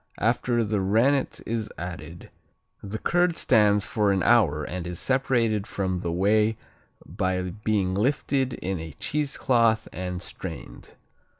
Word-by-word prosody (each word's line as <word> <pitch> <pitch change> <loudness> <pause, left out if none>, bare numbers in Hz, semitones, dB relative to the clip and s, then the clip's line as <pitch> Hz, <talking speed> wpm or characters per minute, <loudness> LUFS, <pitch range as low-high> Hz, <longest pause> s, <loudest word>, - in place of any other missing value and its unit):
After 120 +1 +1
the 105 -1 0
rennet 120 +8 +2
is 110 -1 -2
added, 85 -1 -8 0.5
the 100 +2 -5
curd 175 +5 +1
stands 105 -4 +3
for 105 -3 +1
an 95 -2 +1
hour 90 -11 +4
and 90 +2 -5
is 90 -1 -5
separated 115 -5 +1
from 95 -2 -2
the 85 -1 -3
whey 105 +5 +2 0.5
by 95 +2 -1 0.2
being 100 -4 +1
lifted 130 +4 0
in 95 -1 -3
a 80 -2 -7
cheesecloth 120 - +1
and 90 0 -4
strained. - - -8
105 Hz, 130 wpm, -25 LUFS, 90-120 Hz, 0.5 s, hour